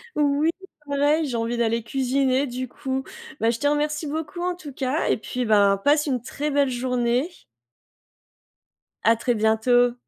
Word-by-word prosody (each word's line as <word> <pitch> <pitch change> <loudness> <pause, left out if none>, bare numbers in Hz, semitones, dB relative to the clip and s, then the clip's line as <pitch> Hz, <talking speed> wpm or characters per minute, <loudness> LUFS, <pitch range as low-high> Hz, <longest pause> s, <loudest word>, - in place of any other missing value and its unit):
Oui, 295 +2 +2 0.4
pareil, 290 +3 +2
j'ai 245 -5 -2
envie 230 +1 -1
d'aller 230 0 0
cuisiner, 265 +2 +1
du 255 0 -4
coup. 265 +2 -4 0.4
Bah, 225 - +2
je 230 - -1
te 290 - +1
remercie 300 +1 0
beaucoup, 315 +3 -4
en 360 0 -1
tout 305 -6 -10
cas 265 +3 -1
et - - +3
puis, 250 +3 -4
ben, 200 -2 +4
passe 290 +9 +2
une 260 -5 -1
très 295 +5 -4
belle 285 -1 +2
journée. 250 +3 0 1.7
À 230 +1 +5
très 240 +2 0
bientôt. 230 +3 +3
260 Hz, 160 wpm, -24 LUFS, 235-290 Hz, 1.7 s, À